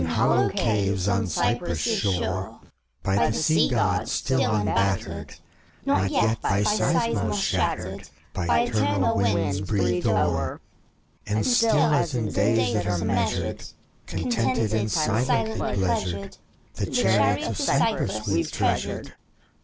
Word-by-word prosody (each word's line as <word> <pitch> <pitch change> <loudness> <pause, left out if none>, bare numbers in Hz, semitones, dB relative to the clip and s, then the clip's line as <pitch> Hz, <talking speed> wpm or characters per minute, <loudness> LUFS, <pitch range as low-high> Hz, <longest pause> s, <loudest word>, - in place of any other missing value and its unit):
In 85 - -1
hollow 80 - +2
caves 100 -3 0
on 100 +1 +1
Cyprus' 85 - -1 0.2
shore. 95 -1 -2 0.4
By 95 +1 +2
the - - -1
Sea 155 0 +3
Gk>d 120 -5 0
still 130 -5 0
unbattered, 100 -2 -1 0.5
Not 95 0 +2
yet 110 +2 +1
by 100 +1 +1
Seismos 210 - +1
shattered, 90 - -2 0.2
By 80 -3 +1
eternal 100 -3 +1
winds 100 -1 0
breathed 90 -3 0
o'er, 85 -4 0 0.7
And 105 +1 0
still, 230 -2 +3 0.2
as 145 -1 +1
in 110 -4 -2
days 115 +3 +2
that 105 - -1
are 85 -1 -1
measured, - - -1 0.4
Contented 130 - -1
and 110 -1 0
silently 110 0 0 0.2
pleasured, 95 0 -2 0.4
The - - -3
chariot - - +2
of - - -4
Cypris - - 0
we've - - 0
treasured. - - -2
100 Hz, 120 wpm, -24 LUFS, 95-115 Hz, 0.7 s, Sea